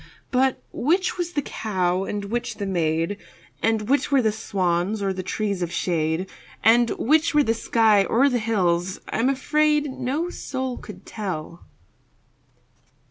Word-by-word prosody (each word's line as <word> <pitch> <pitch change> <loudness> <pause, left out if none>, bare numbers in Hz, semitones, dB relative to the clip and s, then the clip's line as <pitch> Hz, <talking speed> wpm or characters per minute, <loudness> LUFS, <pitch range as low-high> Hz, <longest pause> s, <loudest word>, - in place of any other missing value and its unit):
But 260 0 +1
which 360 +7 0
was 350 0 -2
the 290 - 0
cow 185 -5 -1
and 205 0 -4
which 235 +4 -3
the 205 - -4
maid, 165 0 0 0.4
And 220 -2 +1
which 285 +2 +1
were 270 -3 +4
the 220 - +3
swans 190 -2 -1
or 195 -1 -1
the 185 - -4
trees 200 0 -2
of 170 -1 -2
shade, 165 0 -1 0.4
And 235 +1 +5
which 315 +4 +2
were 295 - +6
the 225 - +2
sky 220 -3 +3
or 250 +8 +3
the 250 -3 +1
hills, 185 -5 0
I'm 240 +4 +1
afraid, 300 +2 +2
No 290 +7 -2
soul 260 -5 -4
could 210 - -11
tell. 175 -5 -6
220 Hz, 150 wpm, -24 LUFS, 185-265 Hz, 0.4 s, were